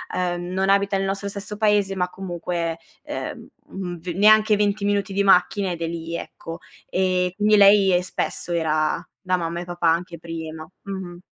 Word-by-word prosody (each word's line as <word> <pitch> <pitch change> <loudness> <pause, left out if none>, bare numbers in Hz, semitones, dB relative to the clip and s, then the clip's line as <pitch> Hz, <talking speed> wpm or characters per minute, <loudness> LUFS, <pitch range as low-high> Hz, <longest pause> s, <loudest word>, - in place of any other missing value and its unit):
uhm, 175 -1 -1
non 190 +1 +1
abita 200 0 +3
nel 195 - -1
nostro 195 +1 -2
stesso 200 +1 -6
paese, 205 -3 +2
ma 180 -1 -1
comunque, 175 -3 -4 0.2
uhm, 180 -3 -7
v 175 - -17
neanche 215 +1 +6
20 205 0 0
minuti 200 -1 0
di 200 +1 +2
macchina 195 +1 +3
ed 170 -1 -5
è 165 - -1
lì, 165 0 -5
ecco. 165 0 -8 0.3
E 185 -1 +1
quindi, 210 +1 +4
lei 195 -3 +6
spesso 180 -1 -3
era 155 -2 0
da 185 -1 0
mamma 170 0 -3
e 175 - -5
papà 175 -1 -1
anche 170 +1 0
prima, 160 -1 -7
mh-mh. 185 -3 -7
185 Hz, 170 wpm, -23 LUFS, 170-200 Hz, 0.3 s, neanche